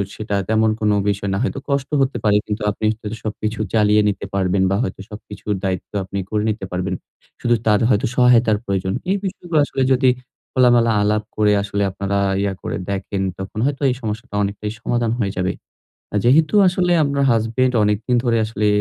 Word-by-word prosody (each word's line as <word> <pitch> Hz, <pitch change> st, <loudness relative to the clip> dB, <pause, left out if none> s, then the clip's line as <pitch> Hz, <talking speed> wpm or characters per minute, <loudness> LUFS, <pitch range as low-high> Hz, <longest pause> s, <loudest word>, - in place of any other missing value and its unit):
সেটা 105 Hz, -1 st, -3 dB
তেমন 110 Hz, 0 st, +3 dB
কোন 105 Hz, -1 st, +2 dB, 0.2 s
বিষয় 100 Hz, 0 st, -2 dB
না। -, -, 0 dB
হয়তো 135 Hz, -, -2 dB
কষ্ট 140 Hz, -1 st, 0 dB
হতে 135 Hz, -2 st, 0 dB
পারে 105 Hz, -1 st, +3 dB
কিন্তু 105 Hz, +1 st, -4 dB
আপনি 105 Hz, -, -4 dB, 0.2 s
যদি 105 Hz, +1 st, -4 dB
সবকিছু 110 Hz, 0 st, -3 dB
চালিয়ে 105 Hz, -1 st, +4 dB
নিতে 100 Hz, 0 st, -4 dB
পারবেন 95 Hz, 0 st, +1 dB
বা 100 Hz, -, +2 dB
হয়তো 95 Hz, -, -4 dB
সবকিছুর 105 Hz, 0 st, -6 dB
দায়িত্ব 95 Hz, -1 st, -3 dB
আপনি 100 Hz, +1 st, -5 dB
করে 105 Hz, -1 st, 0 dB
নিতে 105 Hz, -2 st, -3 dB
পারবেন। 90 Hz, +1 st, -2 dB, 0.5 s
শুধু 120 Hz, -1 st, +3 dB
তার 105 Hz, -2 st, +4 dB
হয়তো 105 Hz, -4 st, +2 dB
সহায়তার 120 Hz, -4 st, +4 dB
প্রয়োজন। 95 Hz, -1 st, -1 dB, 0.2 s
এই 195 Hz, -, +2 dB
বিষয়গুলো 175 Hz, -4 st, -1 dB
আসলে 135 Hz, -, -3 dB
যদি 130 Hz, 0 st, +4 dB, 0.4 s
খোলামেলা 120 Hz, -2 st, +4 dB
আলাপ 105 Hz, +1 st, +1 dB
করে 105 Hz, -1 st, +3 dB
আসলে 100 Hz, 0 st, -1 dB
আপনারা 100 Hz, +1 st, -2 dB, 0.2 s
ইয়ে 100 Hz, -1 st, 0 dB
করে -, -, -3 dB
দেখেন 100 Hz, 0 st, -3 dB, 0.2 s
তখন 95 Hz, +3 st, -6 dB
হয়তো 140 Hz, 0 st, -1 dB
এই 125 Hz, -, 0 dB
সমস্যাটা 110 Hz, +1 st, -5 dB
অনেকটাই 105 Hz, +1 st, -3 dB
সমাধান 120 Hz, -2 st, 0 dB
হয়ে 100 Hz, -4 st, 0 dB
যাবে। 90 Hz, 0 st, 0 dB, 0.6 s
আ -, -, -2 dB
যেহেতু 155 Hz, -, +4 dB
আসলে 180 Hz, 0 st, +1 dB
আপনার 140 Hz, -1 st, 0 dB
হাসব্যান্ড 115 Hz, +3 st, +1 dB
অনেকদিন 105 Hz, +4 st, +1 dB
ধরে 120 Hz, -2 st, +2 dB
আসলে 110 Hz, -1 st, -1 dB
110 Hz, 180 wpm, -20 LUFS, 100-125 Hz, 0.6 s, চালিয়ে